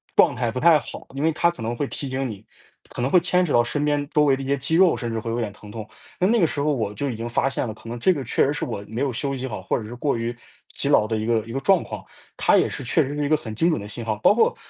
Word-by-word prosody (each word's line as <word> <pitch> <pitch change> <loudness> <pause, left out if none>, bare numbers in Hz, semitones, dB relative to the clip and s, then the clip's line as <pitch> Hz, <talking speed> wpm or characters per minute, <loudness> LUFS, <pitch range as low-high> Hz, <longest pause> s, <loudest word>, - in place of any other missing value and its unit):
状 - - +5
态 120 -1 -1
不 125 - -3
太 165 +2 +6
好。 - - -9
因 135 - -3
为 160 - +3
它 170 +2 +2
可 150 - -12
能 115 +2 -2
会 140 +3 -2
提 140 - -5
醒 130 0 -2
你， 105 -1 -9 0.4
可 - - -6
能 125 - +1
会 180 - +6
牵 180 +1 +2
扯 160 - -3
到 120 - +5
身 145 +5 -2
边 145 -1 0
周 150 - +4
围 135 -2 +3
的 135 - -5
一 - - -6
些 140 +1 +1
肌 140 +4 -1
肉， 180 0 +5
甚 120 -3 -4
至 115 - -2
会 115 - -5
有 115 - -1
点 110 -3 -2
疼 105 +1 -14
痛。 110 -1 -7 0.3
那 185 - +3
那 230 +3 +3
个 170 - +5
时 145 - -3
候 150 +1 +2
我 110 -7 -1
就 140 +5 -2
已 120 - -3
经 115 - -4
发 120 +3 +1
现 130 -2 -2
了， 110 - -4
可 110 +1 -12
能 120 +1 -5
这 185 +10 +4
个 145 -5 -4
确 120 - +2
实 145 - 0
是 - - -4
我 100 -4 -5
没 115 +4 -4
有 140 -1 +1
休 135 +4 -2
息 130 0 -4
好， 105 -6 -6
或 - - 0
者 - - -7
是 115 +3 -8
过 140 +2 0
于 115 +1 -2 0.4
疲 - - -2
劳 105 - +4
的 110 0 -1
一 110 - -2
个 115 0 +2
一 - - -7
个 135 - -2
状 190 +3 +3
况。 - - -8 0.3
它 - - +4
也 - - +3
是 - - -6
确 130 +7 +2
实 140 +2 -4
是 145 0 -1
一 - - 0
个 155 - +4
很 115 -7 -6
精 165 +10 +2
准 120 - -1
的 100 - -8
信 115 +3 -6
号， 110 -1 0
包 110 - +5
括 235 - +3
130 Hz, 370 characters per minute, -23 LUFS, 115-145 Hz, 0.4 s, 太